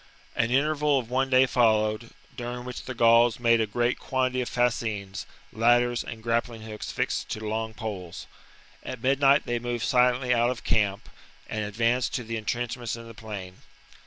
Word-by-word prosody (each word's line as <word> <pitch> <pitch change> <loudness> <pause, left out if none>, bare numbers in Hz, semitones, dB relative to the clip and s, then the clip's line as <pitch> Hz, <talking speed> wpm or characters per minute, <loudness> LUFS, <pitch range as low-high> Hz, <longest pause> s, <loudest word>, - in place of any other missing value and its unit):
An 115 0 +1
interval 150 +2 +2
of 125 -2 -4
one 135 +1 +1
day 130 0 +6
followed, 110 -2 +2 0.3
during 125 -1 -5
which 125 -1 -7
the 130 - -5
Gauls 115 0 +5
made 115 -1 +4
a 110 - 0
great 120 +3 0
quantity 130 -1 0
of 125 - -3
fascines, 110 -5 -1 0.3
ladders, 120 +2 +3
and 110 -1 -8
grappling 115 -1 -1
hooks 110 -1 -6
fixed - - -2
to - - -3
long 110 +1 -3
poles. 100 -7 -6 0.6
At 125 -3 -7
midnight 140 +2 +4
they 120 0 -1
moved 120 -1 -3
silently 125 -1 +3
out 120 0 +3
of 125 - -4
camp 105 -1 0 0.4
and 110 -1 -3
advanced 115 +4 0
to 125 - -2
the 115 0 -4
entrenchments 120 +2 -3
in 115 0 -10
the 115 - -10
plain. 100 -5 -8
120 Hz, 170 wpm, -26 LUFS, 110-125 Hz, 0.6 s, day